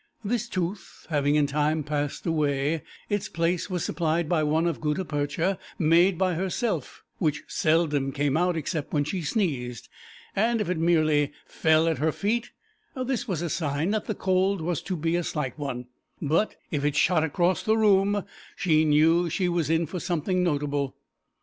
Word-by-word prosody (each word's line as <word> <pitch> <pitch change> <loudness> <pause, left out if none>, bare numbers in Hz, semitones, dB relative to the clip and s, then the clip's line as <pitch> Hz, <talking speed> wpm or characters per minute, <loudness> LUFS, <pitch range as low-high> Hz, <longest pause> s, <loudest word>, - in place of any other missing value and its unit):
This 235 +2 -1
tooth, 185 -1 -4
having 145 -1 +2
in 150 -1 +4
time 150 +2 0
passed 145 -1 -3
away, 150 -1 0 0.3
its 205 -1 -2
place 170 +3 -1
was 180 -3 -2
supplied 165 -1 0
by 165 -1 +2
one 155 +2 +1
of 170 -3 -1
gutta 150 +4 -1
percha, 155 +5 -1 0.2
made 170 +3 +4
by 185 0 +1
herself, 185 - -2 0.2
which 150 -4 0
seldom 150 -4 +1
came 145 0 0
out 175 +1 +2
except 155 -1 -3
when 145 -2 +2
she 180 +5 -3
sneezed, 145 - -2 0.5
and 230 +3 +2
if 180 -4 -1
it 175 - -1
merely 155 -3 +2
fell 160 0 +2
at 165 - 0
her 160 +1 +2
feet 225 +8 -1 0.5
this 255 -2 -2
was 175 -5 -2
a 170 - -2
sign 155 +3 -1
that 215 0 -1
the 215 - -3
cold 190 +1 +1
was 165 0 -2
to 185 - -3
be 165 +2 0
a 175 - 0
slight 150 -7 -3
one, 125 -4 -4 0.3
but 165 +8 +1 0.2
if 145 -2 -1
it 145 -1 +1
shot 175 -1 +3
across 175 +4 +1
the 220 +1 +2
room 205 -1 +3 0.3
she 160 -4 +3
knew 165 +3 +4
she 180 +3 0
was 170 -4 0
in 165 +1 +2
for 175 +4 -5
something 180 +2 0
notable. 145 -4 -1
165 Hz, 175 wpm, -26 LUFS, 150-185 Hz, 0.5 s, in